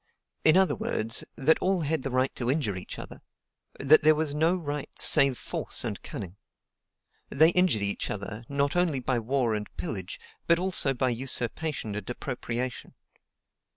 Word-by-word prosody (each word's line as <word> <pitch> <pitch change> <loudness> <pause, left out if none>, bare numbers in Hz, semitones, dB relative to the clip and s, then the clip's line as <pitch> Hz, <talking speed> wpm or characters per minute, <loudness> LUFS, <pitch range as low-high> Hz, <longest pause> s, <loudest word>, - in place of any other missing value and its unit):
In 155 - +5
other 190 -1 +3
words, 115 +1 -1
that 155 +4 +3
all 185 -1 +1
had 155 -1 -1
the 135 - -4
right 130 +1 0
to 120 -1 -2
injure 135 - 0
each 90 - -8
other; - - -9 0.6
that 145 +3 +5
there 155 0 +5
was 155 -1 -1
no 160 +4 +2
right 150 -5 -4
save 135 -3 +5
force - - -2
and - - -4
cunning. 95 0 -8 0.9
They 155 +4 +5
injured 175 - +2
each 100 0 -1
other, 105 +2 -5
not 140 +1 0
only 175 -6 +1
by 125 -1 -1
war 120 0 0
and 105 -1 -4
pillage, 90 +2 -5 0.3
but 170 - +5
also 175 -7 +1
by 130 +1 +1
usurpation 125 0 -2
and 105 0 -6
appropriation. 125 -1 -5
135 Hz, 160 wpm, -27 LUFS, 115-155 Hz, 0.9 s, In